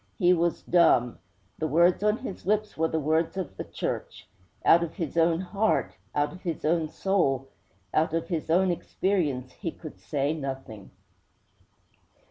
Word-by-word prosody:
He 180 -3 +5
was 170 -1 0
dumb. 145 -9 +3 0.4
The 155 - 0
words 170 +5 +4
on 210 +1 +2
his 200 -8 -8
lips 215 +1 +1
were 160 +1 +1
the 160 - -1
words 160 +4 0
of 190 - -4
the - - -5
Church. - - -5 0.4
Out 170 - +7
of 165 - -5
his 165 -7 -4
own 165 +1 +3
heart, 205 +3 0 0.2
out 145 +2 +1
of 185 - -12
his 165 -4 -4
own 160 0 +1
soul, 140 -9 0 0.4
out 155 +1 +2
of 165 +1 -2
his 165 -4 -3
own 180 +3 +4
experience, 160 -8 -1
he 175 - -5
could 155 -1 -10
say 145 0 -1
nothing.' 135 -8 -6
165 Hz, 160 wpm, -27 LUFS, 150-180 Hz, 0.4 s, Out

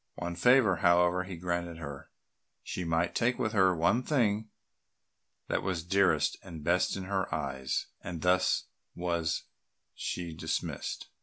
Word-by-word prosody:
One 85 0 -4
favour, 115 -1 +5
however, 90 +1 +3
he 95 -2 -7
granted 85 -1 -2
her; 70 -4 -8 0.5
she 90 - -4
might 85 +1 0
take 120 +2 +1
with 110 -4 0
her 95 -4 +4
the 90 - +1
one 90 +9 +2
thing 110 -6 +1 1.0
that - - 0
was 90 -4 -2
dearest 85 -5 +2
and 85 -5 -9
best 85 +4 +2
in 95 - -4
her 95 0 -2
eyes; 65 -1 -2 0.2
and 85 -2 -5
thus 90 0 +3 0.3
was 85 -2 -1 0.5
she 85 -2 -4
dismissed. 80 - -3
90 Hz, 145 wpm, -30 LUFS, 85-95 Hz, 1.0 s, favour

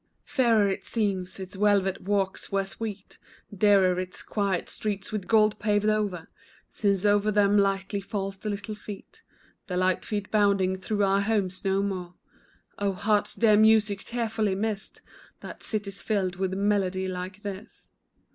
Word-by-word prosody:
Fairer 230 -6 +3
it 195 - -2
seems, 195 -5 -2
its 190 0 -7
velvet 195 -1 +2
walks 195 -1 -1
were 195 0 +1
sweet, 205 0 -7 0.4
Dearer 190 -2 +4
its 185 0 -4
quiet 200 -4 -1
streets, 205 -2 -3
with 210 -3 -4
gold 215 -1 +3
paved 210 -1 +1
o'er, 210 -6 0 0.4
Since 200 -2 0
o'er 205 0 +3
them 205 -1 +3
lightly 195 0 +1
fall 195 0 -3
the 195 +2 -6
little 205 +1 -4
feet 210 - -10 0.5
The 180 - -2
light 185 0 +1
feet 205 -2 -4
bounding 200 -3 +3
through 205 +2 -1
our 195 0 +3
homes 200 -3 -1
no 195 0 +1
more; 180 -3 -4 0.6
Oh, 200 -1 0
heart's 205 +2 +1
dear 215 -3 +4
music, 215 -2 +4
tearfully 220 -4 -1
missed, 210 0 -4 0.4
That - - -9
city's 205 -3 -4
filled 190 -4 -1
with 190 0 -1
melody 195 -2 0
like 185 +2 -6
this. 200 +2 -8
200 Hz, 150 wpm, -27 LUFS, 190-210 Hz, 0.6 s, Dearer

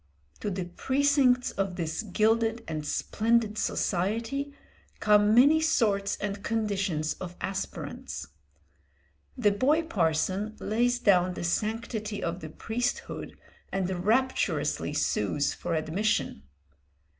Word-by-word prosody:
To - - -2
the 185 -2 -3
precincts 260 - +2
of 195 -2 -2
this 165 -1 -2
gilded 225 +2 +1
and 155 -2 -3
splendid 220 -1 +1
society 225 +10 -1 0.5
come 210 0 +4
many 290 +6 +6
sorts 210 -11 +1
and 200 0 -4
conditions 195 -8 -1
of 180 -1 -6
aspirants. 195 0 -5 1.1
The 210 -5 +3
boy 285 +11 +2
parson 190 - 0
lays 245 +3 +1
down 185 -5 +3
the - - -5
sanctity 215 +3 -2
of 170 +2 -2
the 155 - -7
priesthood 235 - -3 0.3
and 185 -2 -2
rapturously 260 +6 +1
sues 140 -1 0
for 170 -1 -3
admission. 160 - -1
210 Hz, 110 wpm, -28 LUFS, 180-235 Hz, 1.1 s, many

